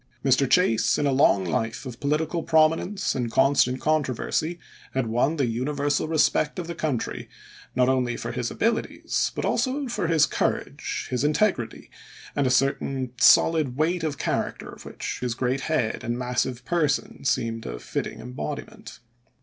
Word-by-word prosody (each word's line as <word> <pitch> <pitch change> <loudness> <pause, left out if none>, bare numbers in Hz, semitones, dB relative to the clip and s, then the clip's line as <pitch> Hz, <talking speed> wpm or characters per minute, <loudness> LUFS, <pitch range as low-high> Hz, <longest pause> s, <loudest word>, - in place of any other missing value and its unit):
Mr. 135 0 +3
Chase, 180 -12 +3
in 145 - 0
a 140 - +2
long 130 -8 +4
life 115 +8 -2
of 125 -1 -8
political 155 +4 0
prominence 165 +5 +2
and 125 -3 -2
constant 130 -1 +3
controversy, 155 +2 0 0.4
had 130 -2 +1
won 120 +7 +1
the 140 -4 +1
universal 145 +6 -1
respect 155 0 +2
of 180 - -3
the 170 - -5
country, 150 -7 -3 0.5
not 125 0 +3
only 125 -2 +1
for - - -4
his 120 -1 -2
abilities, 230 0 -1
but - - -2
also 275 +1 0
for 235 -8 -2
his 160 -3 +4
courage, - - -2
his 125 +1 0
integrity, 150 - 0 0.4
and 140 -2 +2
a - - +2
certain 130 -1 0
solid 155 -2 +5
weight 165 +3 +1
of 150 -3 -2
character - - -2
of - - -12
which - - -5
his 125 -2 -2
great 130 +2 -1
head 140 -9 0
and 120 +1 -2
massive 125 0 -2
per 170 +1 +2
son 135 - -2
seemed 115 -4 -1
a - - -5
fitting - - -4
embodiment. 125 -3 -7
135 Hz, 160 wpm, -25 LUFS, 125-155 Hz, 0.5 s, solid